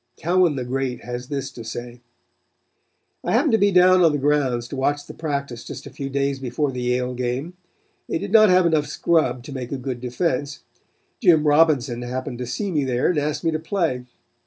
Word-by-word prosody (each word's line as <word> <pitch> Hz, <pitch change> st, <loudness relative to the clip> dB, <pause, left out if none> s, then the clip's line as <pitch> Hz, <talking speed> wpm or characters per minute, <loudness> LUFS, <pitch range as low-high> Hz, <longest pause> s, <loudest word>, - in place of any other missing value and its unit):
Cowan 175 Hz, -1 st, +2 dB
the 130 Hz, -2 st, -3 dB
great 130 Hz, -1 st, -3 dB
has 125 Hz, +1 st, -6 dB
this 135 Hz, -2 st, -4 dB
to 115 Hz, -, -9 dB
say: 120 Hz, +1 st, -7 dB, 1.2 s
"I -, -, -1 dB
happened 300 Hz, -, +3 dB
to 225 Hz, -, +3 dB
be 200 Hz, 0 st, +4 dB
down 185 Hz, 0 st, +6 dB
on 165 Hz, -3 st, +5 dB
the 145 Hz, -, 0 dB
grounds 135 Hz, -4 st, +1 dB
to -, -, -5 dB
watch 145 Hz, +2 st, 0 dB
the -, -, -10 dB
practice 140 Hz, -6 st, -4 dB
just -, -, -8 dB
a -, -, -9 dB
few 135 Hz, -1 st, -5 dB
days 140 Hz, 0 st, -1 dB
before 135 Hz, +3 st, -2 dB
the 125 Hz, -1 st, -5 dB
Yale 125 Hz, +1 st, 0 dB
game. 125 Hz, +7 st, -3 dB, 0.6 s
They -, -, 0 dB
did 200 Hz, +3 st, -5 dB
not 215 Hz, -1 st, +7 dB
have 180 Hz, 0 st, +5 dB
enough 155 Hz, -3 st, +2 dB
scrub 130 Hz, -8 st, +1 dB
to 140 Hz, -, -9 dB
make 125 Hz, -2 st, -6 dB
a 140 Hz, -, -2 dB
good 125 Hz, -1 st, -5 dB
defense. 140 Hz, +2 st, -2 dB, 0.6 s
Jim 165 Hz, -8 st, +5 dB
Robinson 145 Hz, -5 st, +3 dB
happened 125 Hz, +1 st, -5 dB
to 125 Hz, -, -4 dB
see 200 Hz, -, -3 dB
me 150 Hz, -4 st, +1 dB
there 125 Hz, -1 st, +1 dB
and 160 Hz, -, 0 dB
asked 150 Hz, 0 st, -2 dB
me 165 Hz, -, +2 dB
to 155 Hz, -, -2 dB
play. 160 Hz, -7 st, -1 dB
140 Hz, 205 wpm, -22 LUFS, 125-160 Hz, 1.2 s, not